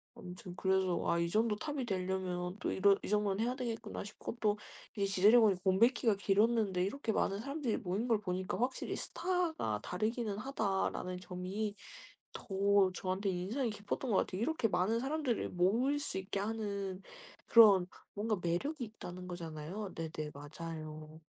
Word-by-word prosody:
아무튼 180 0 -9
그래서 190 -1 +1
'아 170 - +3
이 170 0 +1
정도 220 +2 +2
탑이 275 +3 -3
될려면 185 -2 -2
또 - - -1
이런 195 +1 +4
이 - - -4
정도는 210 0 +1
해야 245 +2 0
되겠구나.' 235 -4 -4
싶고 215 +3 -7
또 210 -1 +2 0.4
이제 200 - +1
지드래곤이 205 +2 +6
공백기가 220 +3 +4
길었는데 200 -1 +2
이렇게 225 +4 -2
많은 200 -2 0
사람들이 275 0 -2
모인 210 +2 -2
걸 225 -3 +3
보니까 185 -2 -2
'확실히 255 +2 -1
스타가 340 - -1
다르기는 215 +2 -1
하다.'라는 195 -6 -1
점이 185 +3 -4 0.6
더 200 -1 +2
저한테 190 +2 -1
인상이 205 +8 -1
깊었던 210 +4 -3
것 195 - +4
같아요. 185 - 0
이렇게 315 -4 +1
많은 195 +5 +1
사람들을 270 -2 -1
모일 230 +11 +2
수 285 -9 -2
있게 190 +1 -3
하는 200 -3 -3 0.5
그런 200 -6 +8 0.3
뭔가 215 0 0
매력이 245 - -1
있다는 185 -5 -8
거잖아요. 175 +3 -6
네네 155 -2 -4
맞아요. 155 +1 -8
200 Hz, 355 characters per minute, -34 LUFS, 180-230 Hz, 0.6 s, 그런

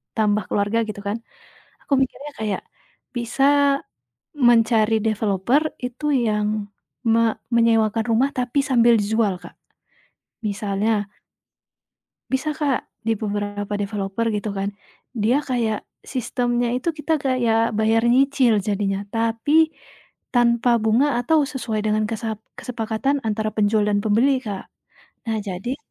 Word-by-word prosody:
tambah 210 -2 +2
keluarga 205 +2 0
gitu 205 -1 -6
kan, 205 +3 -1 0.6
aku - - -10
mikirnya 280 +3 -4
kayak 210 -3 -2 0.5
bisa 240 +3 -2 1.1
mencari 225 -2 +4
developer 215 +5 +1 0.2
itu 250 +4 -6 0.2
yang 210 -1 +1 0.6
me 230 - +4 0.4
menyewakan 225 -1 +3
rumah 260 +5 +3
tapi 250 +2 -1
sambil 235 -2 +5
dijual, 215 0 +1
Kak. - - -11 1.0
Misalnya 205 +1 -1 1.4
Bisa 265 +4 0
Kak, 295 -4 -1 0.2
di 225 0 0
beberapa 205 -1 -3
developer 200 +2 -2
gitu 210 -1 -2
kan, 195 0 -2 0.5
dia 230 +6 +2
kayak 235 -6 -1 0.2
sistemnya 245 -1 -1
itu 325 +7 -1
kita 310 +1 -1
kayak 235 -5 +1
bayar 220 +2 +2
nyicil 250 -3 +4
jadinya, 195 -1 -1
tapi 230 +9 +2 0.6
tanpa 235 0 +3
bunga 240 +6 +3
atau 290 +3 +2
sesuai 235 -6 -3
dengan 215 0 +1
kesa 220 -1 -3 0.2
kesepakatan 245 +4 -1
antara 215 0 -1
penjual 210 0 +3
dan 205 -1 +2
pembeli 255 +6 +3
Kak. 200 -3 -5 0.6
Nah, 220 - 0
jadi 200 +7 -4
225 Hz, 120 wpm, -22 LUFS, 210-250 Hz, 1.4 s, sambil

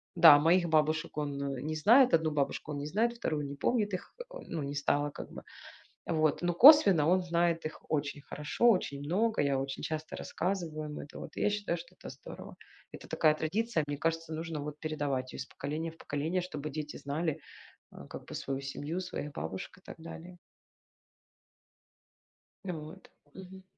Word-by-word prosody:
да 150 -4 +10
моих 170 +3 +3
бабушек 155 0 +1
он, 145 -2 -2 0.2
э, - - -6
не 155 +2 -3
знает, 240 - +6
одну 160 -1 +4
бабушку 150 +1 -2
он - - -3
не 145 - -4
знает, 225 +8 +1
2 155 -10 -2
он 140 - -5
не 140 - -6
помнит 205 - 0
их, 185 - -5
э, - - -4 0.2
ну 165 -3 -3
не 140 +1 -4
стало 145 +1 +1
как - - -9
бы. - - -8 0.6
А - - -2
вот 155 -2 +2
но 175 0 +1
косвенно, 195 - +8
он 185 +2 +4
знает 170 -1 +1
их 155 - -6
очень 145 -1 -1
хорошо, 150 +12 +1
очень 145 -8 -1
много. 205 +9 +1
Я 140 -1 +1
очень 135 0 -4
часто 155 0 -4
рассказываю 160 -5 -3
им 150 - -6
это. 145 - -9
Вот - - -9
я - - +2
считаю, 205 -4 -1
что 175 +2 -12
это - - -10
здорово. 135 - -10 0.4
Это - - -10
такая 155 -1 +3
традиция, 185 +3 0
мне 145 - -3
кажется, 165 +1 -1
нужно 160 -1 -4
вот 150 0 -6
передавать 145 -5 -2
ее - - -7
из 130 - -4
поколения 155 +3 -4
в 165 - -19
поколение, 155 +6 -2
чтобы 155 -4 -5
дети 150 0 -5
знали, 155 +2 -2 0.5
а, - - -11
как - - -8
бы - - -9
свою 135 0 -3
семью, 145 +5 -4
своих 180 -5 -5
бабушек 95 - -6
и - - -24
так - - -9
далее. 170 +2 -10 2.3
Э, 190 - -3
вот. 155 -1 -9 0.2
Мгм. 190 0 -11
155 Hz, 190 wpm, -31 LUFS, 145-180 Hz, 2.3 s, да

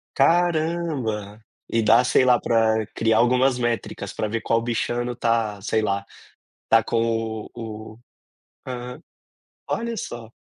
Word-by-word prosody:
Caramba! 155 - 0 0.2
E 115 - +1
dá, 115 +3 +5
sei 125 - +3
lá 125 -2 +4
para 110 -1 +2
criar 110 0 +2
algumas 125 +2 +3
métricas, 115 -4 -3
para 110 - -2
ver 110 +2 -3
qual 115 0 +1
bichano 120 +1 -2
está 115 -3 0
sei 110 +2 0
lá, 100 -2 -1 0.6
está 115 0 +4
com 115 -1 -1
o 110 -2 -7
o 110 - -17 0.7
aham, 125 +2 -6 0.7
olha 235 0 -2
só. 120 - -7
115 Hz, 130 wpm, -23 LUFS, 110-125 Hz, 0.7 s, dá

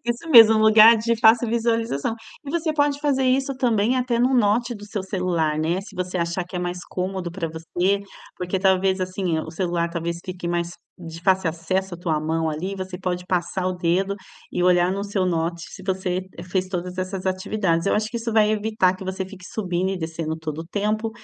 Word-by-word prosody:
Isso 240 +7 -3
mesmo, 225 -4 +9
um 215 - +3
lugar 220 +1 +8
de 230 +1 0
fácil 225 +1 +5
visualização, 230 -6 0 0.3
e 280 - -6
você 320 -1 0
pode 290 -1 +1
fazer 275 -3 +1
isso 270 +1 +1
também 240 -1 +2
até 245 -2 0
no 255 +2 +3
note 240 +2 +2
do 205 -1 -10
seu 205 -2 -4
celular, 175 -5 -1
né? 170 +4 0
Se 195 - -13
você 185 0 -3
achar 170 +2 -1
que 180 - -15
é - - -1
mais 175 0 -3
cômodo 185 -1 -3
para 170 -2 -4
você, 175 +5 -1 0.4
porque 180 +1 -2
talvez, 190 0 +2
assim, 185 -2 -1
o 160 - -7
celular 170 0 -1
talvez 170 0 -3
fique 180 -1 -6
mais 175 0 -1 0.3
de 165 -1 -9
fácil 190 -2 +3
acesso 185 +3 -2
a - - -7
tua 160 -3 -1
mão, 160 +1 -1
ali, 180 +6 -4
você 185 -1 -6
pode 180 -1 -3
passar 185 0 -1
o 185 - 0
dedo 180 +3 0 0.4
e 175 - -1
olhar 180 0 +4
no 200 +1 -3
seu 200 -2 -1
note. 170 -1 -1
Se 190 - -11
você 185 -1 -1 0.2
fez 185 +1 -1
todas 180 0 -4
essas 185 0 -3
atividades, 185 -2 0
eu - - +3
acho 215 +1 0
que 235 - -4
isso 230 0 -3
vai 215 -1 +4
evitar 215 -3 +1
que 185 - -10
você 190 0 -3
fique 190 -1 -12
subindo 185 -2 -2
e 190 - -3
descendo 160 -1 -4
todo 155 -1 -5
o 165 - -6
tempo, 215 +4 -1
185 Hz, 210 wpm, -23 LUFS, 175-215 Hz, 0.4 s, mesmo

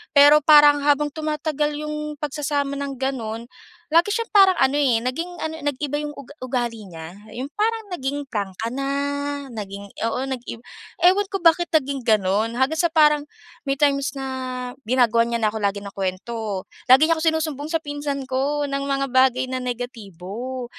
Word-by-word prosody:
Pero 290 +1 +8
parang 295 -1 +7
habang 290 0 +2
tumatagal 300 -1 -2
yung 300 0 -4
pagsasama 285 -1 -2
ng 280 -1 -4
gano'n, 235 -4 -3 0.5
lagi 335 +5 +4
siyang 460 0 -3
parang 385 -2 +6
ano, 270 +2 +3
eh, 250 -5 +3
naging 330 +8 -3
ano, 315 0 -3
nag-iba 290 0 -2
yung 295 0 -5
ug 280 0 -11
ugali 240 -5 -3
niya. 165 -1 -9 0.2
'Yong 260 +4 -5
parang 445 +1 0
naging 285 -2 -3
prangka 205 0 -3
na, 275 +1 -2 0.6
naging 200 -2 -7
oo, 230 +3 -1
nag-iba. 250 -3 -6 0.4
Ewan 390 +3 +5
ko 395 - -1
bakit 340 0 +4
naging 280 -3 +1
gano'n. 215 +1 +2
Hanggang 275 +5 +1
sa 340 - +2
parang 300 -2 +4 0.4
may 275 - +1
times 280 -1 +1
na 270 - -4 0.6
ginagawan 235 -2 +3
niya - - +2
na 215 - +3
ako 220 - -3
lagi 200 0 0
ng 200 - -8
kuwento. 195 +1 -3 0.2
Lagi 265 +4 +8
niya - - +5
akong 315 - -2
sinusumbong 310 -2 -3
sa 325 - +4
pinsan 290 -2 -4
ko 285 +3 0
ng 275 0 -2
mga 275 0 0
bagay 260 0 +3
na 255 - -2
negatibo 240 0 -6
275 Hz, 165 wpm, -22 LUFS, 235-300 Hz, 0.6 s, Pero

